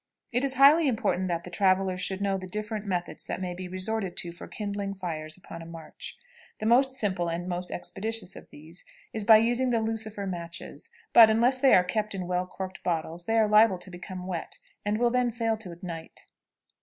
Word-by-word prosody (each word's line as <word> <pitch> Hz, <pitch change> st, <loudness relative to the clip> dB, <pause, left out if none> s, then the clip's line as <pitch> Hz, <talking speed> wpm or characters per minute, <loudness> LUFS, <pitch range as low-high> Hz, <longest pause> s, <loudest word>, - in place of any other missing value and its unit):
It 245 Hz, +2 st, +1 dB
is 270 Hz, -1 st, 0 dB
highly 290 Hz, +4 st, +7 dB
important 200 Hz, -6 st, 0 dB
that 170 Hz, -1 st, -2 dB
travelers 185 Hz, -1 st, +2 dB
should 190 Hz, +1 st, -2 dB
know 200 Hz, -1 st, +1 dB
the 185 Hz, -1 st, -5 dB
different 210 Hz, +2 st, -4 dB
methods 180 Hz, -2 st, -3 dB
that -, -, -3 dB
may 180 Hz, -1 st, -3 dB
be 180 Hz, +1 st, -6 dB
resorted 185 Hz, +1 st, -2 dB
to 170 Hz, -, -2 dB
for 175 Hz, -, -10 dB
kindling 200 Hz, -1 st, -4 dB
fires 155 Hz, -4 st, -4 dB
upon 165 Hz, -2 st, -10 dB
a -, -, -9 dB
march. 165 Hz, -1 st, -9 dB, 0.4 s
The 215 Hz, -, -5 dB
most 260 Hz, +4 st, +4 dB
simple 185 Hz, -7 st, +1 dB
and 170 Hz, +2 st, -3 dB
most 180 Hz, 0 st, -2 dB
expeditious 220 Hz, +1 st, -2 dB
of -, -, -12 dB
these 160 Hz, +4 st, -9 dB, 0.3 s
is 220 Hz, -, -2 dB
by 220 Hz, 0 st, +9 dB
using 240 Hz, +3 st, +2 dB
the 235 Hz, -2 st, +2 dB
lucifer 220 Hz, -2 st, -2 dB
matches; 175 Hz, -, -6 dB, 0.2 s
but, 225 Hz, -2 st, +10 dB
unless 240 Hz, +4 st, +3 dB
they 270 Hz, 0 st, +6 dB
are 180 Hz, -, +6 dB
kept 210 Hz, +3 st, -2 dB
in 185 Hz, -2 st, -3 dB
well 180 Hz, +1 st, -1 dB
corked 190 Hz, +1 st, -7 dB
bottles, 170 Hz, 0 st, -2 dB
they 225 Hz, 0 st, +1 dB
are 220 Hz, -1 st, +4 dB
liable 210 Hz, -2 st, +5 dB
to 180 Hz, +1 st, -10 dB
become 180 Hz, +1 st, -7 dB
wet, 180 Hz, -3 st, -4 dB, 0.3 s
and 205 Hz, +1 st, 0 dB
will 240 Hz, +1 st, +2 dB
then 250 Hz, 0 st, +2 dB
fail 230 Hz, -1 st, 0 dB
to 195 Hz, -5 st, -8 dB
ignite. 170 Hz, -2 st, -8 dB
195 Hz, 205 wpm, -28 LUFS, 180-225 Hz, 0.4 s, but